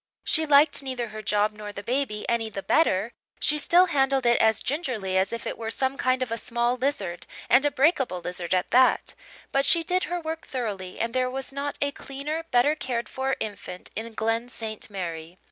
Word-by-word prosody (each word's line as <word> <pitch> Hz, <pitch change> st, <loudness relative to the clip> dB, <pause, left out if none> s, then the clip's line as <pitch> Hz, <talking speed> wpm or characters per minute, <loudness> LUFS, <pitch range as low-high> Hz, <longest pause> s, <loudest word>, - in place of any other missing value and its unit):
She 315 Hz, -1 st, +1 dB
liked 290 Hz, +1 st, +6 dB
neither 255 Hz, -4 st, -4 dB
her 215 Hz, 0 st, -7 dB
job 210 Hz, 0 st, +1 dB
nor 210 Hz, -1 st, -8 dB
the 200 Hz, 0 st, -8 dB
baby 245 Hz, -3 st, -1 dB
any 230 Hz, -1 st, 0 dB
the 195 Hz, -2 st, -6 dB
better; 225 Hz, -, +2 dB, 0.3 s
she 300 Hz, 0 st, +1 dB
still 350 Hz, +5 st, +5 dB
handled 270 Hz, -5 st, +1 dB
it 240 Hz, 0 st, +4 dB
as 220 Hz, -1 st, +4 dB
gingerly 245 Hz, -, -2 dB
as 190 Hz, +1 st, +2 dB
if 230 Hz, 0 st, -5 dB
it -, -, -4 dB
were 225 Hz, -1 st, -3 dB
some 265 Hz, +3 st, -1 dB
kind 255 Hz, -1 st, +1 dB
of 245 Hz, -, -6 dB
a 230 Hz, -, -1 dB
small 240 Hz, +1 st, 0 dB
lizard, 210 Hz, -10 st, -2 dB, 0.2 s
and 270 Hz, +4 st, +6 dB
a -, -, +2 dB
breakable 270 Hz, -, +2 dB
lizard 180 Hz, +1 st, -2 dB
at 180 Hz, 0 st, -1 dB
that; 255 Hz, +1 st, +4 dB, 0.4 s
but 275 Hz, -, +2 dB
she 330 Hz, +4 st, +3 dB
did 365 Hz, +2 st, +1 dB
her 355 Hz, 0 st, -2 dB
work 320 Hz, 0 st, -5 dB
thoroughly 205 Hz, -8 st, -4 dB
and 230 Hz, 0 st, -1 dB
there 255 Hz, 0 st, +1 dB
was 270 Hz, +1 st, -5 dB
not 280 Hz, +1 st, -3 dB
a 285 Hz, -, 0 dB
cleaner, 295 Hz, +4 st, -5 dB
better 245 Hz, +5 st, +4 dB
cared 255 Hz, -6 st, -3 dB
for 265 Hz, 0 st, -1 dB
infant 200 Hz, -3 st, -6 dB
in 225 Hz, 0 st, -5 dB
Glen 225 Hz, +2 st, 0 dB
St. 220 Hz, -3 st, -5 dB
Mary. 170 Hz, -3 st, -6 dB
245 Hz, 205 wpm, -26 LUFS, 215-280 Hz, 0.4 s, liked